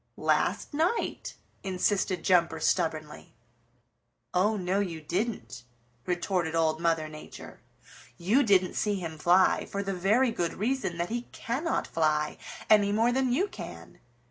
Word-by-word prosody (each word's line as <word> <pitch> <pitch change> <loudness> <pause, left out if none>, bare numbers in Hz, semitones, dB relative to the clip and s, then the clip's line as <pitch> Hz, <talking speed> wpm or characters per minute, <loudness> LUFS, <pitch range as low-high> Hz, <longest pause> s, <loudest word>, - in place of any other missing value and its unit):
"Last - - 0
night," 330 +10 -1 0.3
insisted 190 -1 0
Jumper 175 -2 +3
stubbornly. 155 -2 -2 1.0
"Oh, 210 +4 +2
no, 185 +1 0
you 175 -5 -2
didn't," 175 - -3 0.5
retorted 175 -2 -1
Old 160 -1 +1
Mother 165 -2 +1
Nature. 155 0 -11 0.6
"You 210 +11 +3
didn't 190 -7 +3
see 210 -1 0
him 165 -4 -6
fly, 180 +4 +3
for 200 0 -3
the 195 0 -2
very 215 +8 +2
good 170 -6 -2
reason 220 -5 -1
that 170 0 -2
he 240 +1 -4
cannot 275 +9 -2
fly 155 -2 0 0.3
any 205 -2 +5
more 225 +3 +2
than 260 0 +1
you 360 +11 +2
can. 85 - -10
185 Hz, 135 wpm, -28 LUFS, 165-220 Hz, 1.0 s, any